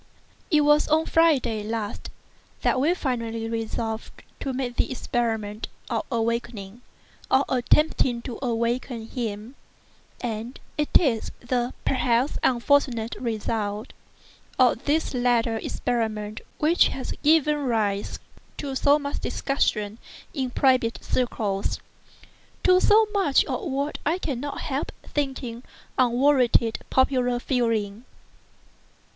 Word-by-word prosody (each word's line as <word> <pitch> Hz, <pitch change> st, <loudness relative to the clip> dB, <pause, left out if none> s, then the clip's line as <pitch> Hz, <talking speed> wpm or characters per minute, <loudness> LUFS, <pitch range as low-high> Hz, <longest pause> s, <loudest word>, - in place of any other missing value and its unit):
It 305 Hz, -5 st, +4 dB
was 295 Hz, +1 st, +4 dB
on 315 Hz, +1 st, +3 dB
Friday 270 Hz, -10 st, +3 dB
last 215 Hz, -1 st, -4 dB, 0.5 s
that -, -, +2 dB
we 315 Hz, +7 st, +3 dB
finally 230 Hz, -7 st, -2 dB
resolved 225 Hz, 0 st, -4 dB, 0.2 s
to 275 Hz, -, -3 dB
make 255 Hz, -2 st, -3 dB
the -, -, +1 dB
experiment 225 Hz, -4 st, -2 dB, 0.2 s
of -, -, -1 dB
awakening, 230 Hz, -2 st, -2 dB, 0.5 s
or 265 Hz, +1 st, +4 dB
attempting 250 Hz, -1 st, +2 dB
to 245 Hz, -4 st, -6 dB
awaken 235 Hz, -1 st, -1 dB
him; 225 Hz, -1 st, -4 dB, 0.7 s
and 230 Hz, +1 st, -4 dB, 0.2 s
it 300 Hz, -1 st, -1 dB
is 250 Hz, -9 st, 0 dB
the 245 Hz, 0 st, -1 dB
(perhaps) 255 Hz, +1 st, +1 dB
unfortunate 240 Hz, -2 st, +2 dB
result 215 Hz, -1 st, -3 dB, 0.6 s
of 255 Hz, 0 st, +3 dB
this 305 Hz, +1 st, +1 dB
latter 240 Hz, -2 st, +2 dB
experiment 215 Hz, -2 st, -2 dB, 0.2 s
which 320 Hz, +3 st, +4 dB
has 265 Hz, -, -4 dB
given 300 Hz, -1 st, +4 dB
rise 220 Hz, -7 st, -1 dB, 0.4 s
to 280 Hz, -2 st, -4 dB
so 285 Hz, +2 st, +4 dB
much 285 Hz, -1 st, -4 dB
discussion 215 Hz, -6 st, -1 dB, 0.3 s
in 265 Hz, -4 st, -1 dB
private 250 Hz, -2 st, +2 dB
circles—to 240 Hz, -, -2 dB
so 435 Hz, +1 st, +6 dB
much 380 Hz, -9 st, +3 dB
of 370 Hz, -, -3 dB
what 280 Hz, +2 st, -2 dB
I 325 Hz, +4 st, +1 dB
cannot 285 Hz, -5 st, -4 dB
help 280 Hz, 0 st, -2 dB
thinking 265 Hz, -5 st, -3 dB, 0.4 s
unwarranted 250 Hz, -2 st, +3 dB
popular 255 Hz, -2 st, +2 dB
feeling. 230 Hz, -3 st, -1 dB
245 Hz, 110 wpm, -25 LUFS, 225-280 Hz, 0.7 s, so